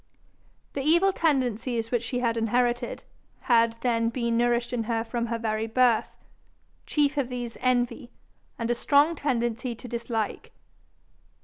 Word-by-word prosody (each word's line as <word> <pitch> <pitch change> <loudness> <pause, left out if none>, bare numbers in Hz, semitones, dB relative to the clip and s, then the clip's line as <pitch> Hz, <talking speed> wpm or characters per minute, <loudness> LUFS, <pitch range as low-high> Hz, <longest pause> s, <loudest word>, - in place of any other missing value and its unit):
The 280 - -2
evil 345 +7 +3
tendencies 245 - 0
which 240 -2 +1
she 245 +1 -3
had 230 -2 +1
inherited, 240 +2 0 0.4
had 230 -2 +3
then 230 -2 +1
been 235 -1 -1
nourished 240 +1 +1
in 230 -2 -1
her 225 0 0
from 235 0 -3
her 230 0 -2
very 220 -1 -2
birth 240 0 +2 0.7
chief 295 -1 +1
of 265 -3 0
these 245 -2 -5
envy, 245 -1 0 0.5
and 230 0 -1
a - - +4
strong 290 +6 +3
tendency 240 -4 -1
to 240 - -10
dislike. 235 -2 -3
240 Hz, 140 wpm, -26 LUFS, 230-255 Hz, 0.7 s, a